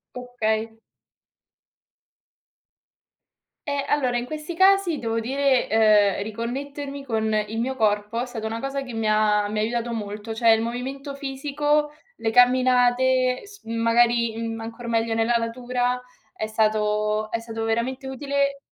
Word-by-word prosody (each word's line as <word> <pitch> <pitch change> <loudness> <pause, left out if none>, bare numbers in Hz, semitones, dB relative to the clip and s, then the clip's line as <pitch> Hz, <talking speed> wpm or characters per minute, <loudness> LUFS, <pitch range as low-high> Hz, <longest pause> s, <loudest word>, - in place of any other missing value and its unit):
Okay. 225 -3 -2 2.9
Eh, 285 -1 -1
allora, 255 -4 +1
in 240 - -3
questi 310 +5 -6
casi 380 -4 +4
devo 230 -1 -1
dire, 270 +1 +1
ehm, 210 -3 +4
riconnettermi 275 +6 -5
con 220 -3 -1
il 215 +1 -1
mio 260 +2 -2
corpo 210 0 +1
è - - -2
stata 230 -3 -6
una 225 +1 -3
cosa 275 +1 -3
che 255 - -7
mi 225 -1 -1
ha 210 -1 +3
mi 210 +1 -4
ha - - +2
aiutato 235 +1 -1
molto. 210 0 -5
Cioè, 230 +1 +3
il 225 0 +5
movimento 265 +4 -5
fisico, 290 +2 -1 0.3
le 225 - -1
camminate, 255 +1 +4
s 410 0 -14
magari, 230 0 +2
mhmm, 225 0 -4
ancor 230 +1 -7
meglio 230 0 0
nella 225 +1 +1
natura, 245 +2 -1 0.4
è 215 - -3
stato 215 0 0
è 230 - -1
stato 225 -1 -5
veramente 235 +4 -1
utile 280 +1 -1
235 Hz, 140 wpm, -24 LUFS, 225-265 Hz, 2.9 s, il